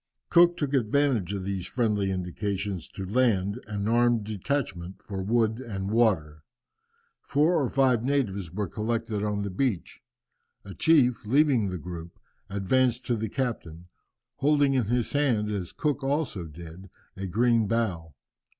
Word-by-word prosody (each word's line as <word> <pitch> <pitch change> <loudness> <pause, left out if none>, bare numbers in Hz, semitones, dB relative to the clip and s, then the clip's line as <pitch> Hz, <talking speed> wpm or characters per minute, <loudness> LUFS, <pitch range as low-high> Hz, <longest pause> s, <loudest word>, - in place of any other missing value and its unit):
Cook 175 0 +6
took 145 -2 -2
advantage 125 -5 +1
of 100 -2 -3
these 95 -2 -3
friendly 105 -5 0
indications 95 0 -3
to 95 - -7
land 105 -1 +1
an 105 -1 -3
armed 120 -1 +3
detachment 100 -4 -3
for 95 -2 -6
wood 110 +2 +1
and 100 -6 -4
water. 85 -10 +1 0.8
Four 155 +2 +2
or 125 - -1
five 130 -4 +2
natives 105 -10 -1
were 100 +2 -2
collected 110 +1 -2
on 105 -1 -1
the 100 - -4
beach. 100 -2 -2 0.6
A 100 - -8
chief, 125 - +3
leaving 130 -5 +3
the 90 - -4
group, 85 0 -8 0.3
advanced 120 +5 +1
to 120 - +1
the 110 -1 -3
captain, 100 -10 -4 0.5
holding 145 -1 +3
in 130 -4 +2
his 120 +2 0
hand, 120 -8 +1
as 95 -4 -3
Cook 145 -2 -2
also 135 - -1
did, 85 +4 -11 0.3
a 95 0 -5
green 115 +2 +2
bough. 95 -9 -2
110 Hz, 145 wpm, -27 LUFS, 95-130 Hz, 0.8 s, Cook